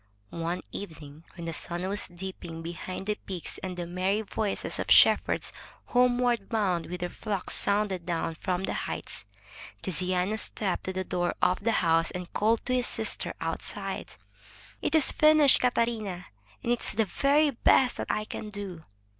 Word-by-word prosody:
One 170 Hz, +2 st, -2 dB
evening, 160 Hz, -4 st, -9 dB
when 170 Hz, -2 st, -7 dB
the 165 Hz, -, -3 dB
sun 175 Hz, +3 st, -1 dB
was 200 Hz, +1 st, 0 dB
dipping 175 Hz, -2 st, -7 dB
behind 175 Hz, +3 st, -5 dB
the 210 Hz, -, +1 dB
peaks 185 Hz, -4 st, -5 dB
and 185 Hz, -1 st, -5 dB
the 175 Hz, -, -3 dB
merry 185 Hz, +4 st, 0 dB
voices 210 Hz, 0 st, -2 dB
of -, -, -3 dB
shepherds -, -, +5 dB, 0.3 s
homeward 245 Hz, -3 st, +2 dB
bound 190 Hz, -7 st, 0 dB
with 180 Hz, +1 st, -6 dB
their 175 Hz, -, -1 dB
flocks 205 Hz, -1 st, -3 dB
sounded 200 Hz, -3 st, +2 dB
down 165 Hz, -1 st, -2 dB
from 180 Hz, +3 st, -2 dB
the -, -, -1 dB
heights, -, -, -4 dB, 0.6 s
Tiziano 185 Hz, +2 st, 0 dB
stepped 200 Hz, -3 st, -1 dB
to 185 Hz, -, -2 dB
the 190 Hz, 0 st, -2 dB
door 175 Hz, -1 st, -1 dB
of 185 Hz, -, +2 dB
the 230 Hz, +1 st, +2 dB
house 165 Hz, 0 st, +3 dB
and 180 Hz, -1 st, -7 dB
called 220 Hz, +2 st, +2 dB
to 255 Hz, -, 0 dB
his 250 Hz, -1 st, +3 dB
sister -, -, -2 dB
outside: -, -, -3 dB, 0.7 s
"It -, -, 0 dB
is 310 Hz, -4 st, +6 dB
finished, 305 Hz, -2 st, +6 dB
Catarina, 230 Hz, -7 st, 0 dB, 0.4 s
and 235 Hz, -, 0 dB
is 240 Hz, -, 0 dB
the 220 Hz, +1 st, +2 dB
very 285 Hz, -, +3 dB
best 250 Hz, +1 st, +3 dB
that -, -, -4 dB
I 215 Hz, -, 0 dB
can 215 Hz, -, -6 dB
do!'' 195 Hz, -5 st, -6 dB
190 Hz, 165 wpm, -28 LUFS, 175-225 Hz, 0.7 s, is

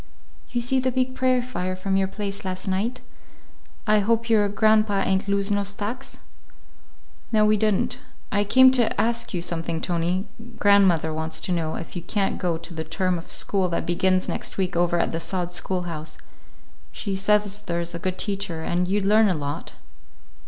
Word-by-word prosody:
"You 245 Hz, -, -1 dB
see 260 Hz, +2 st, +1 dB
the 255 Hz, 0 st, 0 dB
big 255 Hz, 0 st, 0 dB
prairie 255 Hz, -1 st, +2 dB
fire 185 Hz, -7 st, -3 dB
from 190 Hz, +1 st, -1 dB
your 195 Hz, 0 st, +2 dB
place 200 Hz, 0 st, -5 dB
last 185 Hz, 0 st, -4 dB
night? 215 Hz, +7 st, -1 dB, 0.8 s
I 215 Hz, -1 st, +4 dB
hope 230 Hz, +2 st, +1 dB
your 210 Hz, -2 st, +4 dB
grandpa 215 Hz, -1 st, +3 dB
ain't 190 Hz, +1 st, 0 dB
lose 200 Hz, 0 st, +1 dB
no 205 Hz, 0 st, +2 dB
stacks?" 210 Hz, +6 st, -4 dB, 1.1 s
"No, 215 Hz, -2 st, +4 dB
we 215 Hz, 0 st, +4 dB
did 215 Hz, -1 st, +2 dB
n't. -, -, -1 dB, 0.3 s
I 205 Hz, 0 st, +2 dB
came 260 Hz, +5 st, +7 dB
to 240 Hz, -5 st, +2 dB
ask 235 Hz, +2 st, 0 dB
you 175 Hz, -3 st, -2 dB
something, 165 Hz, -1 st, -2 dB
Tony. 175 Hz, +3 st, -1 dB, 0.3 s
Grandmother 190 Hz, -6 st, +4 dB
wants 160 Hz, 0 st, -2 dB
to -, -, -3 dB
know 165 Hz, -3 st, -1 dB
if 165 Hz, -, -7 dB
you 175 Hz, -, -3 dB
can't 195 Hz, +3 st, -1 dB
go 175 Hz, -3 st, 0 dB
to 170 Hz, +1 st, -9 dB
the 160 Hz, -1 st, -4 dB
term 180 Hz, +2 st, -1 dB
of 165 Hz, -, -12 dB
school 190 Hz, -2 st, 0 dB
that 170 Hz, -, -2 dB
begins 185 Hz, +2 st, +2 dB
next -, -, -3 dB
week 185 Hz, -2 st, -1 dB
over 175 Hz, 0 st, +2 dB
at -, -, +1 dB
the 165 Hz, -, -2 dB
sod 180 Hz, 0 st, -2 dB
schoolhouse. 175 Hz, -3 st, -4 dB, 0.7 s
She 200 Hz, -3 st, -4 dB
says 205 Hz, +1 st, +1 dB
there's 170 Hz, -3 st, -3 dB
a 170 Hz, -, -4 dB
good 185 Hz, +1 st, -2 dB
teacher, 195 Hz, -6 st, -2 dB
and 180 Hz, +2 st, 0 dB
you'd 200 Hz, +1 st, 0 dB
learn 215 Hz, +1 st, +5 dB
a 185 Hz, -, +1 dB
lot." 145 Hz, -1 st, -5 dB
195 Hz, 185 wpm, -24 LUFS, 175-210 Hz, 1.1 s, came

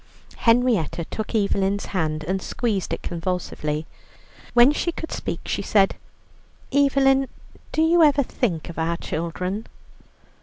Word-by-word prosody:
Henrietta 230 Hz, -, +2 dB
took 220 Hz, +5 st, -5 dB
Evelyn's 200 Hz, -1 st, +1 dB
hand 155 Hz, -4 st, -1 dB
and 190 Hz, +4 st, -2 dB
squeezed 215 Hz, -4 st, -2 dB
it -, -, -3 dB
convulsively. 165 Hz, -3 st, -3 dB, 0.7 s
When 240 Hz, +3 st, +8 dB
she 345 Hz, +3 st, -1 dB
could 325 Hz, -, -7 dB
speak, -, -, -4 dB
she -, -, -2 dB
said: 195 Hz, -2 st, +3 dB, 0.8 s
"Evelyn, 270 Hz, -1 st, +4 dB, 0.4 s
do 315 Hz, -, +2 dB
you 335 Hz, +1 st, +4 dB
ever 290 Hz, -3 st, +5 dB
think 180 Hz, -, -2 dB
of 170 Hz, -, -7 dB
our 165 Hz, +1 st, 0 dB
children?" 180 Hz, +7 st, -3 dB
200 Hz, 125 wpm, -23 LUFS, 170-265 Hz, 0.8 s, When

